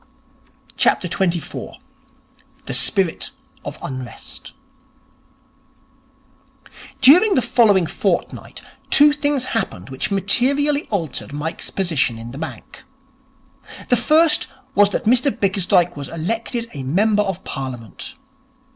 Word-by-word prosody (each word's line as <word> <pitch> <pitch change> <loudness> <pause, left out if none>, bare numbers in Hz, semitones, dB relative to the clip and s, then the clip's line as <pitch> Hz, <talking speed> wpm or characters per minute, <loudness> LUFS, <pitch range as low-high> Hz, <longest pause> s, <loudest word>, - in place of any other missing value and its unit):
24. 180 -2 0 0.9
The - - -4
Spirit 190 -5 +2 0.3
of - - -7
Unrest 130 -3 -8 2.5
During 355 +11 +7
the 255 - +3
following 205 -7 +4
fortnight, - - -3 0.3
two 295 +1 +6
things 290 -3 0
happened 180 - -4
which 130 - -3
materially 270 - +1
altered 165 - -4
Mike's 155 +3 -5
position 145 -11 0
in 115 +1 -8
the 135 - -8
bank. 160 +10 -8 1.1
The - - +5
first 315 +1 +4 0.3
was 205 0 +5
that - - -3
Mr 250 +5 +4
Bickersdyke 190 -5 +1
was 145 -1 -6
elected 230 +8 -3
a 140 - -6
member 205 +10 +2
of 195 -2 -3
Parliament. 130 - -7
195 Hz, 100 wpm, -20 LUFS, 155-250 Hz, 2.5 s, During